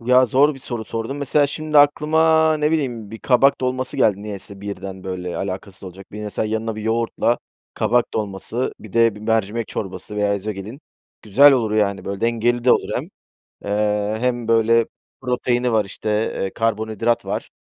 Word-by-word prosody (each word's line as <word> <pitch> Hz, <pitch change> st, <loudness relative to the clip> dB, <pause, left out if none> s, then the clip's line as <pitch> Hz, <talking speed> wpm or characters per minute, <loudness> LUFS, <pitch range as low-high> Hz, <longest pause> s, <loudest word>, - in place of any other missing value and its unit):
Ya, 125 Hz, +2 st, +4 dB
zor 140 Hz, +6 st, +3 dB
bir -, -, -11 dB
soru 120 Hz, -4 st, -5 dB
sordun, 115 Hz, +5 st, -4 dB
mesela 145 Hz, +1 st, +2 dB
şimdi 150 Hz, +1 st, +1 dB
aklıma, 160 Hz, +2 st, +4 dB
ne 150 Hz, 0 st, +1 dB
bileyim, 125 Hz, -9 st, -2 dB
bir 110 Hz, -, -8 dB
kabak 135 Hz, +1 st, +3 dB
dolması 130 Hz, 0 st, -2 dB
geldi 100 Hz, -1 st, +2 dB
niyeyse 100 Hz, -1 st, -8 dB
birden, 95 Hz, -2 st, -7 dB
böyle, 90 Hz, -2 st, -4 dB
alakasız 95 Hz, 0 st, -5 dB
olacak. 95 Hz, +2 st, -11 dB
Bir 105 Hz, -, -7 dB
mesela 105 Hz, +1 st, -2 dB
yanına 110 Hz, 0 st, -2 dB
bir 110 Hz, -, -5 dB
yoğurtla, 115 Hz, +1 st, 0 dB, 0.4 s
kabak 120 Hz, 0 st, +1 dB
dolması, 110 Hz, +4 st, -3 dB
bir 110 Hz, -, -12 dB
de, 115 Hz, -2 st, +4 dB
bir 105 Hz, -, -11 dB
mercimek 110 Hz, 0 st, -1 dB
çorbası 95 Hz, +1 st, -6 dB
veya 105 Hz, -1 st, +1 dB
ezogelin 105 Hz, +5 st, -6 dB, 0.4 s
güzel 140 Hz, +8 st, +6 dB
olur 115 Hz, -5 st, +1 dB
yani 100 Hz, -3 st, 0 dB
böyle, 100 Hz, 0 st, -5 dB
dengeli 120 Hz, +1 st, +1 dB
de 125 Hz, -, +6 dB
olur -, -, +1 dB
hem. -, -, -2 dB, 0.6 s
Eee, 105 Hz, +1 st, 0 dB
hem 120 Hz, -1 st, -1 dB
böyle 115 Hz, 0 st, +4 dB, 0.4 s
proteini 125 Hz, -1 st, 0 dB
var 110 Hz, -2 st, +2 dB
işte, 105 Hz, +2 st, -6 dB, 0.3 s
eee, 95 Hz, -, -2 dB
karbonhidrat 110 Hz, +1 st, 0 dB
var, -, -, -4 dB
115 Hz, 170 wpm, -21 LUFS, 105-125 Hz, 0.6 s, güzel